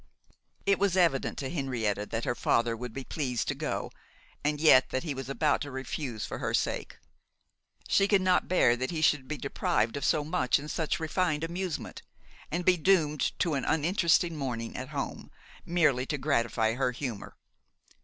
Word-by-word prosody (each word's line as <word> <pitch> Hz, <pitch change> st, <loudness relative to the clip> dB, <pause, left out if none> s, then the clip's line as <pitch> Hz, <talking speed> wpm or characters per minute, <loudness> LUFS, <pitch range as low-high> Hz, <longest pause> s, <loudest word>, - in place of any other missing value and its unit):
It 200 Hz, -1 st, +3 dB
was 195 Hz, -2 st, +2 dB
evident 170 Hz, -7 st, +2 dB
to 135 Hz, -, -3 dB
Henrietta 115 Hz, -9 st, -2 dB
that 115 Hz, 0 st, -3 dB
her -, -, +1 dB
father 115 Hz, -1 st, +1 dB
would 125 Hz, +1 st, -6 dB
be 135 Hz, +4 st, -6 dB
pleased 130 Hz, -5 st, -2 dB
to -, -, +1 dB
go, -, -, -3 dB, 0.5 s
and 150 Hz, 0 st, 0 dB
yet 130 Hz, -5 st, +6 dB
that 130 Hz, -, -2 dB
he 155 Hz, -4 st, -3 dB
was 135 Hz, -1 st, -6 dB
about 150 Hz, +2 st, +1 dB
to 145 Hz, -, -4 dB
refuse 130 Hz, -3 st, -4 dB
for -, -, -6 dB
her -, -, 0 dB
sake. -, -, -2 dB, 0.9 s
She 195 Hz, -, +3 dB
could 200 Hz, -2 st, +3 dB
not 185 Hz, -1 st, +3 dB
bear 150 Hz, -10 st, +4 dB
that 130 Hz, +1 st, -3 dB
he 165 Hz, -3 st, -3 dB
should 150 Hz, -4 st, +2 dB
be 155 Hz, -, -3 dB
deprived 115 Hz, -5 st, 0 dB
of 140 Hz, -, -4 dB
so 150 Hz, -, +2 dB
much 155 Hz, -4 st, +1 dB
and 150 Hz, +2 st, -6 dB
such 160 Hz, 0 st, -1 dB
refined 160 Hz, -1 st, 0 dB
amusement, 175 Hz, +1 st, -4 dB, 0.5 s
and 175 Hz, +3 st, -2 dB
be 185 Hz, -1 st, +5 dB
doomed 155 Hz, -4 st, +2 dB
to 170 Hz, -, 0 dB
an 140 Hz, -, -1 dB
uninteresting 170 Hz, +1 st, +2 dB
morning 120 Hz, -5 st, -4 dB
at 130 Hz, +1 st, -5 dB
home, 145 Hz, -2 st, -5 dB, 0.4 s
merely 150 Hz, -7 st, +2 dB
to 145 Hz, -, -1 dB
gratify 115 Hz, -5 st, +1 dB
her 130 Hz, +1 st, 0 dB
humour. 120 Hz, -5 st, -6 dB
145 Hz, 180 wpm, -29 LUFS, 125-165 Hz, 0.9 s, yet